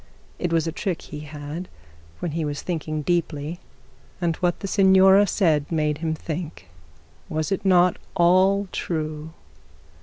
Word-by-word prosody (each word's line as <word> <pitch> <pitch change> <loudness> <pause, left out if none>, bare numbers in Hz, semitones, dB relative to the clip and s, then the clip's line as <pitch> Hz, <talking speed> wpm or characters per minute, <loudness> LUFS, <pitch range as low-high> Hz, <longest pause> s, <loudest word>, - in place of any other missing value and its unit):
It 175 - -1
was 165 -1 +2
a 165 - -2
trick 180 +1 -3
he 150 - -8
had 150 +3 -7 0.5
when 175 - -2
he 160 +1 -2
was 145 -1 -4
thinking 155 -3 -3
deeply; 165 -1 -1 0.6
and 170 -2 0
what 175 -1 0
the 195 - -3
signora 190 0 +6
said 160 -7 +1
made 150 -2 0
him 160 -1 -1
think. 155 - -6 0.6
Was 155 +1 -2
it 195 +1 -1
not 180 -2 +4 0.2
all 190 +3 +4
true? 155 -2 -3
165 Hz, 145 wpm, -24 LUFS, 155-185 Hz, 0.6 s, signora